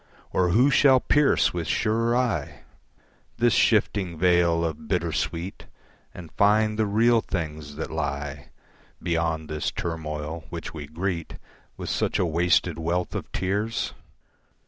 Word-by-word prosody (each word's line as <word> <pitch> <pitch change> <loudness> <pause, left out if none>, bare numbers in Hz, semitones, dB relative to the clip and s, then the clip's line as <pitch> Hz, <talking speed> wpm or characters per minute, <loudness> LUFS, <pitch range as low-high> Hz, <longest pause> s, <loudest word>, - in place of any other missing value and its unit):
Or 90 -1 +2
who 125 +10 +4
shall 135 -3 +6
pierce 145 +2 +3
with 85 -3 -3
surer 115 - +1
eye! 115 - -1 0.8
This 120 -1 +3
shifting 100 -5 +2
veil 85 -1 +3
of 80 +7 -5
bittersweet 85 0 -2 0.4
And 85 -3 -11
find 110 +1 +2
the 110 - +2
real 115 +3 +3
things 75 -6 -5
that 80 - -5
lie 75 -2 -4 0.5
Beyond 80 -2 -1
this 75 0 -2
turmoil, 80 -1 -5
which 85 -2 -6
we 75 -3 -7
greet 85 +1 -4 0.4
With - - -5
such - - 0
a - - +2
wasted 85 +1 +1
wealth 85 +2 -1
of - - -5
tears? 100 +5 -1
85 Hz, 130 wpm, -25 LUFS, 80-105 Hz, 0.8 s, shall